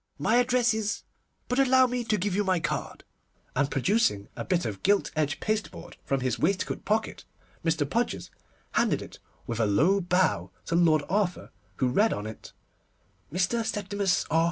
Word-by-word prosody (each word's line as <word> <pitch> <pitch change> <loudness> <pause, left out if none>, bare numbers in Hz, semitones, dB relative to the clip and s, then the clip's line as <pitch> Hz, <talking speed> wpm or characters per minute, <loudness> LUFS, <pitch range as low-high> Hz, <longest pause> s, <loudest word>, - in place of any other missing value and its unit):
My 230 - +2
address 245 -1 +3
is—, 215 -1 -2 0.4
but 250 +2 0
allow 260 -1 +5
me 250 -1 -2
to 215 -1 +1
give 190 0 -1
you 205 - +2
my 185 -2 +1
card'; 170 - -4 0.5
and 140 +1 +1
producing 135 - +1
a - - -4
bit 180 -3 0
of 105 -4 -4
gilt 200 +1 +2
edge 150 -2 0
pasteboard 215 0 -3
from 135 -1 -1
his 130 -2 -1
waistcoat 185 +5 -1
pocket, 220 +1 -1 0.4
Mr. 160 -3 +1
Podgers 235 - -2 0.4
handed - - +1
it, - - -12 0.3
with 115 -1 -4
a 110 - +3
low 170 - +3
bow, 180 +1 +1 0.2
to - - -3
Lord 160 -4 +4
Arthur, 190 -1 -1 0.2
who 130 - +1
read 210 - +3
on 105 - -4
it, 110 0 -9 0.8
_Mr. 190 +7 +1
SEPTIMUS 205 -3 0
R. 160 - +4
190 Hz, 170 wpm, -27 LUFS, 155-220 Hz, 0.8 s, allow